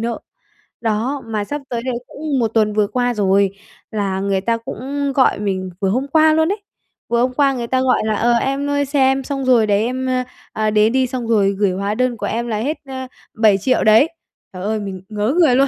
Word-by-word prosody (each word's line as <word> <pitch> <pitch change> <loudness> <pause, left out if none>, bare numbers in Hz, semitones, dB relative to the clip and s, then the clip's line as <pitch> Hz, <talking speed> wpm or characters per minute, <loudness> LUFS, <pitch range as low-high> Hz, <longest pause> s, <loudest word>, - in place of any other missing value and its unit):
nợ. 235 0 -2 0.6
Đó, 230 +5 -1
mà 215 -2 -2
sắp 290 +8 -5
tới 235 -2 -2
đây 255 -1 -2
cũng 290 -2 -3
một 230 - +2
tuần 215 -2 +2
vừa 210 -1 +2
qua 245 +3 0
rồi, 200 -2 +2 0.4
là 200 -3 -1
người 195 -1 0
ta 230 +3 0
cũng 275 +4 -4
gọi 260 - +3
mình 190 -2 -2
vừa 195 - +1
hôm 255 +7 0
qua 315 +2 +4
luôn 320 +3 +2
ấy. 410 +1 -3 0.5
Vừa 235 0 +2
hôm 255 +1 +1
qua 275 0 +3
người 240 -2 -4
ta 260 +2 +1
gọi 260 -1 +2
là: 215 -1 0
"Ờ, 240 +3 +2
em 275 +4 0
ơi 285 0 +1
xe 280 +1 -1
em 265 0 +3
xong 275 -1 -3
rồi 240 -4 +4
đấy, 205 0 +2
em, 255 +2 -2
ơ, 255 0 0 0.3
à, 215 0 0
đến 215 +1 +3
đi", 260 -1 +2
xong 250 -2 -4
rồi 205 -4 +3
gửi 200 -2 +2
hóa 200 +3 -2
đơn 255 0 0
của - - -4
em 235 +1 -2
là 220 -2 -1
hết, 285 +8 -2
a, 260 -1 -6 0.3
7.000.000 220 +2 +3
đấy. 220 +8 +5 0.4
Trời 185 0 -7
ơi, 215 +2 -1
mình 195 -3 -6
ngớ 215 +4 -1
người 305 -8 +5
luôn. 275 +2 +4
235 Hz, 235 wpm, -19 LUFS, 210-265 Hz, 0.6 s, đấy